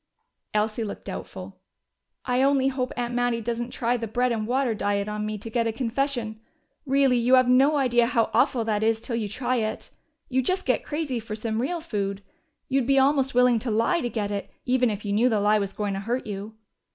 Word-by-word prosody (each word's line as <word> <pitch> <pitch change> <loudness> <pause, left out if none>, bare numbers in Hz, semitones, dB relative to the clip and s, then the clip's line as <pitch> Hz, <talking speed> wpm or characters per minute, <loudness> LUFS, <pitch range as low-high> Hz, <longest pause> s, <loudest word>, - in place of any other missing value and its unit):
Elsie 215 +2 0
looked 205 - -7
doubtful. - - -8 0.7
"I 250 0 +1
only 270 -1 +3
hope 260 -2 -2
Aunt 240 0 -2
Mattie 245 -1 +1
doesn't 235 +1 -3
try 245 0 0
the 230 -1 -4
bread 245 +3 0
and 215 -2 -2
water 255 -1 +1
diet 205 -1 -1
on 210 0 -3
me, 215 0 -3
to 210 - -9
get 230 0 0
a - - 0
confession. 235 -1 -2 0.5
Really, 270 -2 +3
you 245 +2 +5
have 255 -1 +4
no 265 +4 +5
idea 240 -3 +3
how 235 -2 +1
awful 235 -3 +2
that 210 -2 0
is 225 0 +2
till 230 +1 -4
you 220 -3 -2
try 250 +3 -1
it. 220 -1 -3 0.4
You 260 0 +1
just 370 +8 -1
get - - +1
crazy 295 -5 -2
for 220 -1 -6
some 220 +1 -2
real 335 +6 -2
food. 200 -9 -3 0.4
You'd 265 -2 +1
be 275 0 +3
almost 270 -1 +3
willing 250 -2 +5
to 240 - -4
lie 230 +11 +2
to 240 - -2
get 210 -3 -2
it, 200 -1 -4 0.2
even 250 -1 +2
if 210 0 -5
you 200 - -1
knew 235 +5 +3
the 220 -3 +1
lie 210 +1 +3
was 200 -1 -2
going 205 -1 -3
to 195 - -3
hurt 235 +6 -2
you." 210 +1 -6
235 Hz, 220 wpm, -25 LUFS, 215-255 Hz, 0.7 s, you